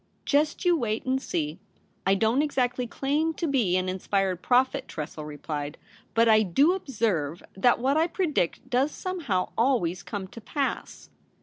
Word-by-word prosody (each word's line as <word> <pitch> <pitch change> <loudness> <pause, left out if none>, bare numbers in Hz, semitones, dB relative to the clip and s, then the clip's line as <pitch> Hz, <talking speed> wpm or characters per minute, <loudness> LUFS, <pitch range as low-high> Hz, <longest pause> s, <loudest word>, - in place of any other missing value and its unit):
* - - -41
Just 300 +4 +1
you 350 -1 +5
wait 225 -7 -2
and 260 +1 0
see. 155 - -3 0.5
I 195 - +5
don't 225 +6 +2
exactly 250 -4 0
claim 300 +6 0
to 340 - -2
be 240 - +2
an 185 0 -1
inspired 190 0 -1
prophet,' 260 +2 +2
Tressel 155 0 -6
re 150 -1 -8
plied; 145 0 -4 0.2
' - - -28
but 230 0 +5
I 215 -1 +6
do 275 - +3
observe 210 - -1
that 240 +6 +3
what 270 +5 +1
I 325 +2 +3
predict 305 - -1
does 260 +3 +1
somehow 300 - -2
always 220 -8 +1
come 195 0 -5
to 230 - -11
pass.' 275 +5 -4
235 Hz, 175 wpm, -27 LUFS, 185-280 Hz, 0.5 s, I